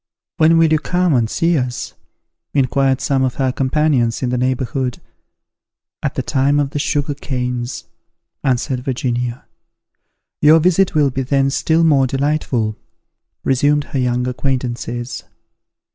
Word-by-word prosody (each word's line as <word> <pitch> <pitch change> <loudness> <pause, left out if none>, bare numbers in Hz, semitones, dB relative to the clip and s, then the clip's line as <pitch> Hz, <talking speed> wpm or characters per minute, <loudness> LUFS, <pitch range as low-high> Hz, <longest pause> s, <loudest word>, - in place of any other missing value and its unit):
"When 160 +1 +5
will 165 -1 +4
you 155 - +3
come 180 0 +1
and 115 -4 +2
see 165 +6 +1
us?" 125 -1 -4 0.6
inquired 135 0 +2
some 135 -1 +1
of 130 -1 0
her 130 -2 0
companions 130 -3 +1
in 125 - 0
the 125 - -1
neighbourhood. 130 0 -1 1.0
"At - - -2
the - - -2
time 140 +2 +1
of 140 -1 -1
the 145 - -3
sugar 145 0 -1
canes," 125 -3 -4 0.6
answered 130 0 0
Virginia. 125 -1 -3 1.0
"Your 155 +2 +7
visit 180 +2 +2
will 145 -3 +3
be 135 - -2
then 135 +1 +1
still 160 +4 +2
more 140 -5 +4
delightful," 135 -5 -1 0.7
resumed 145 +3 +2
her 135 - 0
young 125 0 0
acquaintances. 125 -2 -3
135 Hz, 135 wpm, -18 LUFS, 125-145 Hz, 1.0 s, Your